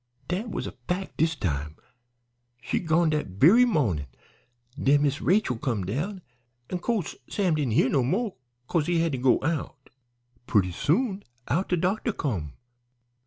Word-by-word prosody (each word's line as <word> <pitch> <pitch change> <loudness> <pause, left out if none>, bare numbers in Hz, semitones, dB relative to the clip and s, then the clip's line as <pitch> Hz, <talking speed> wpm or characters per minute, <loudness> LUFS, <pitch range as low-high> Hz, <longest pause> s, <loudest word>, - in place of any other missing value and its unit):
"Dat 195 +7 -2
was - - -3
a - - -5 0.2
fac' 185 +2 -3
dis 160 +1 +1
time; 75 - -3 0.8
she'd 145 +8 -2
gone 160 0 +3
dat 150 -1 -1
very 160 - +6
mawnin'. 110 - 0 0.7
Den 145 +1 +4
Miss 145 +1 0
Rachel 180 - +2
come 115 -10 -1
down, 170 - -3 0.5
an' 180 - -1
co'se 210 -5 -2
Sam 190 -5 +1
didn't 145 -7 0
hear 125 - +4
no 135 0 +2
mo' 195 - -1 0.3
'cause 160 +3 0
he 175 -1 +2
had 165 -1 +1
to 130 - -2
go 125 0 +3
out. 145 -3 -3 0.6
Purty 95 -5 +2
soon 195 - 0 0.3
out 170 +10 0
de 180 - +2
doctor 200 +6 0
come. 90 - -3
155 Hz, 160 wpm, -26 LUFS, 125-185 Hz, 0.8 s, very